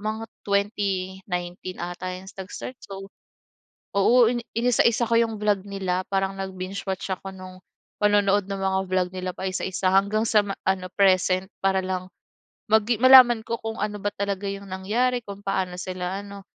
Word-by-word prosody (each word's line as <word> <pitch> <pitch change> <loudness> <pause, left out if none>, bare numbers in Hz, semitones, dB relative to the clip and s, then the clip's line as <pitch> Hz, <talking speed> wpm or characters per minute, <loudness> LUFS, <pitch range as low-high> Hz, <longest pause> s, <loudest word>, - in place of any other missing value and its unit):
mga 215 +2 -3 0.2
2019 190 -3 -2
ata 175 +1 -4
yung 190 - -13
nag 190 -1 -9
start. 255 - -7
So, 195 0 -8 0.9
oo 235 +4 +5
ini-inisa-isa 235 -1 +1
ko 230 - +1
yung 225 -1 0
vlog 205 -2 +1
nila 190 -2 -1
parang 195 0 0
nag-binge-watch 190 0 -4
ako 190 +1 -9
nung 185 -1 -10 0.4
panonood 205 -1 +3
ng 195 -1 -4
mga 190 0 +1
vlog 185 -1 +1
nila 185 0 -3
paisa-isa 185 -1 -1
hanggang 200 +3 +3
sa 210 -2 +4
ma 195 - -3
ano 190 -1 +1
present 190 -1 +3
para 190 0 +2
lang 185 -1 -3 0.6
magi 220 +2 +3
malaman 255 -3 +8
ko 230 - -2
kung 225 0 -4
ano 210 0 -2
ba 205 - -1
talaga 200 0 -2
yung 200 0 -6
nangyari, 235 +7 0
kung 200 -1 -8
paano 185 -2 -1
sila 185 +1 -4
ano, 200 -1 -10
195 Hz, 155 wpm, -25 LUFS, 185-210 Hz, 0.9 s, malaman